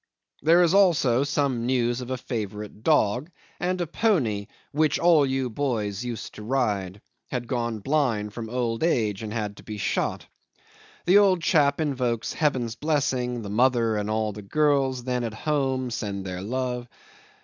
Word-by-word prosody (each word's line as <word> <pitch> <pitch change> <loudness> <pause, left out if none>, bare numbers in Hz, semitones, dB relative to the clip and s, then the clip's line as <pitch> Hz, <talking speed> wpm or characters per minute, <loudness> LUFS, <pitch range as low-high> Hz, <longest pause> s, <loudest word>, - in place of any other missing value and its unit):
There 170 +3 +5
is 170 0 +3
also 155 -11 +4
some 140 -5 0
news 120 -1 +1
of 125 - -7
a 130 - -2
favourite 105 -3 -5
dog; 130 0 +2 0.3
and 180 +1 -1
a 175 - 0
pony, 145 - 0 0.2
"which 150 0 +2
all 165 -5 +5
you 130 -1 0
boys 110 -5 -2
used 120 -2 -5
to - - -10
ride," 105 -5 -1 0.3
had 120 -2 -3
gone 115 -3 -2
blind 120 -7 0
from 115 -1 -6
old 120 -2 -1
age 110 - +1
and 110 -1 -5
had 105 -2 -3
to - - -13
be 105 -1 -6
shot. 100 - -1 0.8
The 190 +4 +6
old 190 -4 +3
chap 145 -4 +3
invokes 125 -7 -1
Heaven's 130 -7 0
blessing; 130 -5 -1
the 100 - -6
mother 120 -1 +3
and 105 0 -2
all 110 0 0
the 105 +1 -8
girls 135 +2 +1
then 125 -1 -1
at 115 -2 -4
home 135 -2 -1
send 100 -3 -4
their 90 -1 -5
love. 125 +2 -3
125 Hz, 165 wpm, -25 LUFS, 110-145 Hz, 0.8 s, The